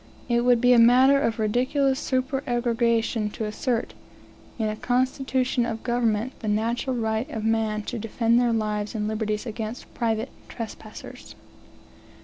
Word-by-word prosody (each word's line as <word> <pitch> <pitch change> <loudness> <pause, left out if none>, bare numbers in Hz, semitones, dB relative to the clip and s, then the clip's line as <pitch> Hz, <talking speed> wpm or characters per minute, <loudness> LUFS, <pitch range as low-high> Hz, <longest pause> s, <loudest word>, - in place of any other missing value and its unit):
It 240 -1 +2
would 245 -1 +4
be 250 +1 +5
a 240 - +6
matter 260 +4 +6
of 230 -6 0
ridiculous 255 +5 +1
supererogation 240 -4 0
to 220 - -3
assert, 230 +3 -2 0.6
in 220 -2 0
a 215 - -2
constitution 255 +1 0
of 225 -1 -4
government, 235 0 0
the 220 - -6
natural 230 +5 0
right 220 +3 -1
of 220 -6 -4
men 220 -1 0
to 235 +2 -5
defend 230 +2 +1
their 240 -1 +2
lives 210 -1 -2
and 210 -1 -1
liberties 215 0 -2
against 220 0 -6
private 225 -2 -1 0.2
trespassers. 220 -2 -9
230 Hz, 140 wpm, -25 LUFS, 220-250 Hz, 0.6 s, a